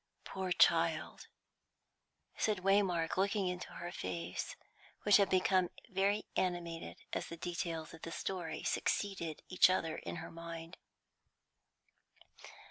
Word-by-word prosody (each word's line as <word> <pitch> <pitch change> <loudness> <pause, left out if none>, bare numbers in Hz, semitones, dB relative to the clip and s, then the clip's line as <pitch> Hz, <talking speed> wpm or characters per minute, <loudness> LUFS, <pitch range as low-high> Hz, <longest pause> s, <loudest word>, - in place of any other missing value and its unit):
"Poor 190 -1 -4
child!" - - +3 1.1
said 210 -4 0
Waymark, 190 -5 +3
looking 195 0 +2
into 180 0 -4
her 175 0 -5
face, 90 - -4 0.5
which 205 -1 +7
had 200 -2 +4
become 185 -1 +3 0.2
very 200 +1 +1
animated 175 -2 -2 0.2
as - - -1
the 170 - -7
details 165 -2 -3
of 165 - -11
the 165 - -6
story 170 -3 -3
succeeded 190 -6 -1
each 185 0 +6
other 165 -4 0
in 85 - -5
her - - -6
mind. 165 +1 -7
180 Hz, 120 wpm, -35 LUFS, 165-190 Hz, 1.1 s, which